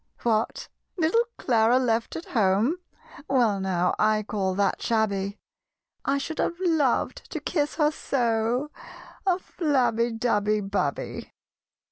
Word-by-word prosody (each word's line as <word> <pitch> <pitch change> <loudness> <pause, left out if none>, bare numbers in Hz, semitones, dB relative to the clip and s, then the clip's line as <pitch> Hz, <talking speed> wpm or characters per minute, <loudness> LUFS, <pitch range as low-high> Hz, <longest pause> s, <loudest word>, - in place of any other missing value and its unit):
"What! 225 -1 0 0.3
little 365 +8 +3
Clara 235 0 +3
left 230 -3 0
at 330 - -5
home? 215 - +2 0.5
Well 235 -7 +3
now, 180 -2 +1
I 215 0 +3
call 195 -3 -1
that 200 0 +1
shabby: 205 -3 0 0.7
I 275 - +1
should 310 +3 -4
have 340 - -1
loved 320 -8 +1
to - - -4
kiss 295 -3 -1
her 300 -2 +3
so 245 0 0 0.6
(A 360 -2 +4
flabby, 255 -10 0
dabby, 215 -2 +1
babby!) 195 -8 -3
230 Hz, 120 wpm, -26 LUFS, 210-285 Hz, 0.7 s, A